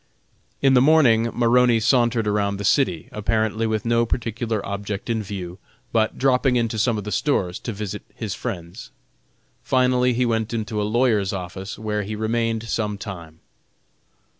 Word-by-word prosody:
In 135 -1 +5
the 125 - +6
morning 125 -6 +4
Maroney 120 0 +3
sauntered 120 -1 +2
around 100 -1 0
the 100 - -4
city, 95 - +1
apparently 110 +1 0
with 110 0 -2
no 115 0 +3
particular 115 -2 -2
object 100 +2 -4
in 110 -1 0
view, 95 -3 -7 0.3
but 110 -1 +1
dropping 130 -1 +2
into 115 -2 0
some 115 +1 +2
of 105 - -4
the 105 - -5
stores 95 -12 0
to 115 - -5
visit 105 -2 -5
his - - -4
friends. 90 +8 -6 0.7
Finally 125 -1 +2
he 125 +1 +1
went 115 -1 -1
into 110 -1 -2
a 105 - -1
lawyer's 110 -5 +2
office 95 +1 -6
where 105 -1 -2
he 105 +2 -5
remained 115 +1 -1
some 105 -3 -2
time. 85 -6 -9
110 Hz, 160 wpm, -22 LUFS, 100-120 Hz, 0.7 s, the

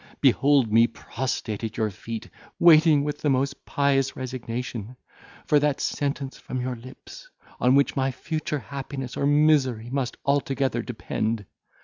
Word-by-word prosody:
behold 135 -2 +4
me 115 +1 +6
prostrate 115 -2 -4
at 110 0 -4
your 110 -1 0
feet, 110 +3 -7 0.3
waiting 160 -3 +6
with 150 0 -3
the 150 - 0
most 135 +1 0
pious 140 -1 +1
resignation, 125 -2 -5 0.5
for 150 - +4
that 145 -1 +1
sentence 140 -1 -2
from 130 - -5
your 125 0 -2
lips, 130 - -12 0.3
on 125 +2 +4
which 140 0 +3
my 135 0 +1
future 155 +3 -3
happiness 135 0 -6
or 140 - 0
misery 140 -6 +3
must 135 -2 -2
altogether 135 -3 +1
depend. 110 -2 -3
135 Hz, 140 wpm, -25 LUFS, 120-140 Hz, 0.5 s, me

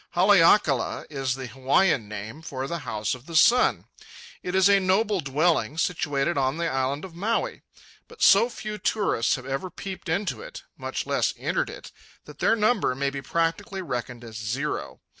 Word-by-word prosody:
Haleakala 175 - +4
is 135 -3 -1
the 135 -1 -6
Hawaiian 130 - +1
name 110 +8 -7
for 135 -4 -5
"the 170 +4 -4
House 110 -7 -2
of 125 +1 -10
the 165 - -7
Sun." 240 +9 +4 0.6
It 180 - -4
is 190 0 +5
a 200 -1 +5
noble 195 +2 +1
dwelling, 150 -2 +1
situated 150 -3 0
on 135 +3 0
the 170 0 -1
Island 135 +2 -1
of 185 - -11
Maui; 205 +7 -2 0.5
but 465 - -6
so 215 +5 +6
few 215 -3 -6
tourists 200 - +1
have 125 - -8
ever 135 +7 -3
peeped 190 -1 -7
into 190 - -1
it, - - -9
much - - -4
less - - 0
entered - - -1
it, - - -10 0.3
that - - -13
their - - +3
number 215 - +1
may 140 +1 -1
be 140 0 -5
practically 170 +6 -2
reckoned 125 -4 -5
as 110 -2 -9
zero. 125 +8 -4
160 Hz, 175 wpm, -25 LUFS, 135-195 Hz, 0.6 s, so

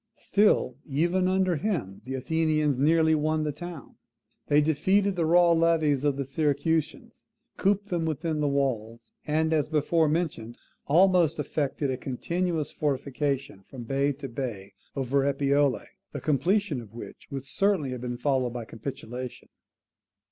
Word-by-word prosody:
Still, 200 - +2
even 170 +6 +1
under 185 -2 +2
him, 140 - -3
the 130 +1 -4
Athenians 155 0 0
nearly 160 +2 +4
won 155 0 +1
the 150 - -1
town. 165 -1 -9 0.5
They 145 - +4
defeated 185 +7 +2
the 165 -3 0
raw 175 +1 +5
levies 165 -4 +2
of 145 -2 +1
the 140 - -2
Syracusans, 150 +3 -1 0.3
cooped 205 +1 +1
them 170 -2 -1
within 160 0 -2
the 150 - +1
walls, 120 -5 -2 0.2
and, 160 +1 +1
as 150 -1 +1
before 155 +1 +2
mentioned, 150 -8 -2 0.3
almost 175 0 +4
effected 145 -1 -2
a 130 - -2
continuous 165 +5 -2
fortification 140 -4 -2
from 120 +5 -10
bay 135 +4 0
to 140 0 -7
bay 115 -7 -5 0.2
over 135 +1 +1
Epipolae, 140 0 +1 0.3
the - - -4
completion 155 - +1
of 110 -1 -14
which 120 - -10
would 135 -1 -5
certainly 165 -1 +1
have 125 -2 -5
been 120 -1 -4
followed 130 -2 0
by 120 -2 -5
capitulation. 125 +1 -7
145 Hz, 145 wpm, -27 LUFS, 135-165 Hz, 0.5 s, raw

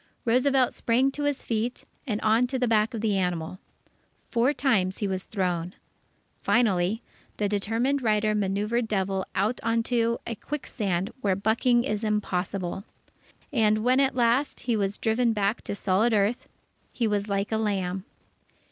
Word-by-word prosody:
Roosevelt 255 +2 +3
sprang 255 +4 +2
to 290 +1 -3
his 290 -2 -1
feet 230 +2 -2 0.2
and 210 -3 -1
on 225 +3 +3
to 260 +1 -2
the 250 -1 +1
back 225 +1 +2
of 220 - -3
the 215 -3 +1
animal. 180 -1 -2 0.7
Four 240 +3 +3
times 230 -10 +1
he 205 - -1
was 190 -1 -3
thrown. 180 -3 -2 0.7
Finally, 210 -2 +2 0.3
the 205 - +1
determined 225 +7 0
rider 215 -2 +2
manœuvred 210 +3 0
Devil 195 -2 -1
out 210 +6 0
on 230 0 +1
to 235 -1 +1
a 235 - -3
quicksand 210 -7 -3
where 195 -4 +2
bucking 230 +4 +2
is 215 -4 -2
impossible. 195 -3 -2 0.7
And, 215 -3 +3
when 255 +2 +3
at 270 -1 +2
last, 245 +3 +1
he 240 -2 0
was 200 -1 -1
driven 230 +1 +1
back 205 +1 0
to - - -3
solid 205 +4 +2
earth, 210 +4 +1 0.4
he 235 - 0
was 205 -1 0
like 200 +1 -1
a 220 - +1
lamb. 190 -3 -1
215 Hz, 155 wpm, -26 LUFS, 195-240 Hz, 0.7 s, Roosevelt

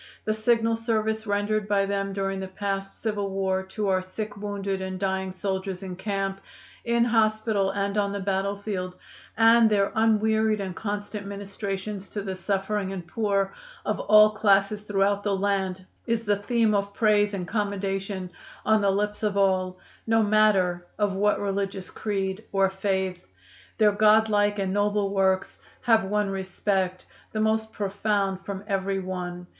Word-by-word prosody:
The 215 - +1
signal 225 +1 +2
service 220 -1 -1
rendered 205 +1 0
by 200 -1 +2
them 195 0 -1
during 195 0 -2
the 190 - -4
past 195 0 -4
civil 205 -3 -1
war 190 -1 0
to 205 +2 -3
our 185 -1 +2
sick, 205 +3 -6
wounded 200 -1 -3
and 190 0 -4
dying 190 -1 -1
soldiers 190 0 -3
in 185 -1 -5
camp, 195 0 -3 0.4
in 235 0 +2
hospital 215 -3 +2
and 200 0 -1
on 200 -1 0
the 200 - -3
battlefield, 195 -1 -2 0.4
and 230 0 +6
their 200 -2 +2
unwearied 220 -1 +2
and 190 -2 -4
constant 205 0 -4
ministrations 200 0 -5
to 205 - -4
the 190 -1 -4
suffering 195 +1 -1
and 185 -3 -5
poor 200 0 0 0.3
of - - -1
all 215 0 +6
classes 205 -1 +2
throughout 200 -1 +1
the 205 -1 0
land, 190 -2 -1 0.2
is 230 -1 0
the 205 0 +3
theme 225 +1 +1
of 200 0 -1
praise 210 -2 +3
and 180 -2 -4
commendation 195 -2 -2 0.3
on 220 0 +4
the 200 - +3
lips 210 +2 -1
of 210 -2 0
all, 185 -2 +2 0.3
no 225 0 +4
matter 205 -4 +3
of 205 -2 +1
what 205 +2 +2
religious 195 -1 -3
creed 195 -1 -2
or 195 -1 +2
faith. 190 -2 -2 0.5
"Their 210 -1 +5
God 215 +1 +4
like 205 0 +2
and 190 -1 -1
noble 205 -1 +1
works 190 -1 +1 0.2
have 225 -3 +4
won 205 0 0
respect, 190 -1 -1 0.3
the 215 - -2
most 220 0 +1
profound 200 -1 -1
from 200 0 -5
every 195 -1 -1
one. 180 -1 -5
200 Hz, 160 wpm, -26 LUFS, 195-210 Hz, 0.5 s, and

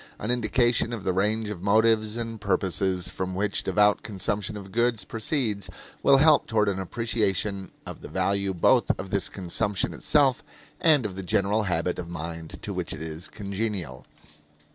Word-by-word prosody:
An 110 - -2
indication 120 0 +2
of 110 -5 -5
the 95 - 0
range 105 +3 0
of 100 -5 -6
motives 110 +2 +2
and 115 -2 -5
purposes 95 -1 0
from 95 0 -4
which 100 +1 0
devout 105 +2 +3
consumption 105 +1 -3
of 95 -1 -10
goods 115 -2 +1
proceeds 110 - -2 0.3
will 140 - +6
help 150 +1 +5
toward 105 -3 +2
an 95 -1 -2
appreciation 100 -2 -1 0.2
of - - -8
the - - -8
value 100 0 0
both 85 - +3
of 95 0 -7
this 100 -2 0
consumption 100 +2 0
itself 140 -4 +2 0.4
and 155 -8 +4
of 95 -3 -4
the 95 - -4
general 100 +3 +1
habit 90 0 -1
of 85 -1 -6
mind 85 -1 -6
to - - -4
which - - -3
it - - -8
is 80 +1 -5
congenial. 100 - -4
100 Hz, 165 wpm, -26 LUFS, 95-115 Hz, 0.4 s, will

